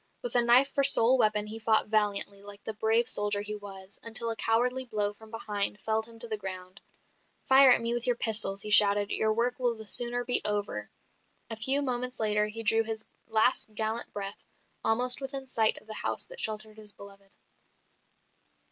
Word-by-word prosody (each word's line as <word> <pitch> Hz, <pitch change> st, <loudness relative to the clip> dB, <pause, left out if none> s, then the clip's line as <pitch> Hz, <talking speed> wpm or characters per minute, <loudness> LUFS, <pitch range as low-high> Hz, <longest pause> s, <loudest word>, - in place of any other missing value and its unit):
With 245 Hz, -, -4 dB
a 245 Hz, -, +4 dB
knife 250 Hz, +4 st, +3 dB
for 280 Hz, -, +1 dB
sole 260 Hz, -2 st, +6 dB
weapon 215 Hz, -2 st, +2 dB
he 220 Hz, +1 st, -7 dB
fought 220 Hz, -1 st, +3 dB
valiantly, 205 Hz, -2 st, 0 dB
like 205 Hz, 0 st, -9 dB
the 220 Hz, -, -5 dB
brave 225 Hz, +2 st, 0 dB
soldier 205 Hz, -4 st, -1 dB
he 210 Hz, +1 st, -3 dB
was, 195 Hz, -1 st, -10 dB
until 230 Hz, 0 st, 0 dB
a -, -, -1 dB
cowardly 250 Hz, +4 st, 0 dB
blow 210 Hz, -4 st, -3 dB
from 220 Hz, +1 st, -17 dB
behind 210 Hz, -2 st, -3 dB
felled 220 Hz, +1 st, -2 dB
him 230 Hz, -1 st, -11 dB
to 235 Hz, +1 st, -1 dB
the 220 Hz, -1 st, -4 dB
ground. 185 Hz, -1 st, -9 dB, 0.6 s
"Fire 265 Hz, 0 st, +6 dB
at 245 Hz, -, +5 dB
me 230 Hz, 0 st, -1 dB
with 240 Hz, +1 st, -1 dB
your 245 Hz, -, +1 dB
pistols," 210 Hz, -4 st, +1 dB
he 210 Hz, -, -6 dB
shouted, 205 Hz, -1 st, +5 dB
"your 220 Hz, -, 0 dB
work 240 Hz, +3 st, -2 dB
will 245 Hz, -2 st, -1 dB
the 220 Hz, 0 st, -11 dB
sooner 240 Hz, +3 st, -1 dB
be 245 Hz, -, +4 dB
over." 205 Hz, -1 st, 0 dB, 0.6 s
A -, -, -2 dB
few 270 Hz, +6 st, 0 dB
moments 250 Hz, -1 st, -4 dB
later 210 Hz, -1 st, 0 dB
he 225 Hz, +2 st, -8 dB
drew 225 Hz, +1 st, +2 dB
his 220 Hz, -1 st, -6 dB, 0.2 s
last 220 Hz, 0 st, 0 dB
gallant 220 Hz, +2 st, -2 dB
breath, 200 Hz, 0 st, -7 dB, 0.4 s
almost 245 Hz, +4 st, +2 dB
within 270 Hz, 0 st, -6 dB
sight 225 Hz, -4 st, +2 dB
of -, -, -14 dB
the 215 Hz, -, -8 dB
house -, -, -4 dB
that -, -, -13 dB
sheltered 215 Hz, 0 st, -2 dB
his 210 Hz, -1 st, -8 dB
beloved. 200 Hz, -1 st, -16 dB
220 Hz, 195 wpm, -28 LUFS, 210-240 Hz, 0.6 s, sole